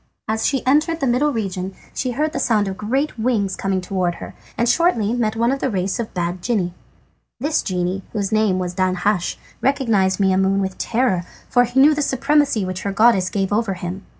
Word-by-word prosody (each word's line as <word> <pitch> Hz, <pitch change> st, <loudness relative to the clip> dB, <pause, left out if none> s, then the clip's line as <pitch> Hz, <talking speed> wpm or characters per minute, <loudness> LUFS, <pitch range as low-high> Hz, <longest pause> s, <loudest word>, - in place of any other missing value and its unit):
As 220 Hz, +1 st, 0 dB
she 270 Hz, -2 st, -1 dB
entered 305 Hz, +5 st, +2 dB
the 275 Hz, -, 0 dB
middle 265 Hz, +4 st, +2 dB
region 190 Hz, -5 st, -3 dB, 0.2 s
she 255 Hz, -1 st, -2 dB
heard 305 Hz, +4 st, -1 dB
the -, -, -2 dB
sound 215 Hz, -4 st, +2 dB
of 190 Hz, -, -3 dB
great 250 Hz, +6 st, -2 dB
wings 220 Hz, -5 st, 0 dB
coming 195 Hz, -1 st, -1 dB
towards 180 Hz, -2 st, -1 dB
her, -, -, -9 dB, 0.2 s
and 235 Hz, -, +1 dB
shortly 240 Hz, -, +2 dB
met 225 Hz, -3 st, 0 dB
one 235 Hz, +2 st, +2 dB
of 275 Hz, -, -1 dB
the 265 Hz, -, 0 dB
race 190 Hz, +1 st, -1 dB
of 230 Hz, -, -3 dB
bad 175 Hz, 0 st, -2 dB
genii. 185 Hz, -5 st, -1 dB, 0.7 s
This 300 Hz, +5 st, +1 dB
genie, 185 Hz, 0 st, -2 dB
whose 200 Hz, -2 st, -2 dB
name 215 Hz, -3 st, +2 dB
was 180 Hz, -1 st, -3 dB
Danhasch, 185 Hz, 0 st, 0 dB, 0.3 s
recognised 225 Hz, -9 st, +1 dB
Maimoune 190 Hz, 0 st, +2 dB
with 190 Hz, -1 st, -3 dB
terror, 230 Hz, -7 st, +1 dB, 0.2 s
for 245 Hz, -1 st, +3 dB
he 245 Hz, +2 st, 0 dB
knew 295 Hz, +3 st, +7 dB
the 295 Hz, -, -1 dB
supremacy 275 Hz, -5 st, +2 dB
which 185 Hz, 0 st, -4 dB
her 200 Hz, -, -2 dB
goodness 200 Hz, -3 st, +4 dB
gave 195 Hz, -1 st, -1 dB
her -, -, +2 dB
over 220 Hz, -4 st, -1 dB
him. 180 Hz, +2 st, -6 dB
215 Hz, 205 wpm, -20 LUFS, 190-255 Hz, 0.7 s, knew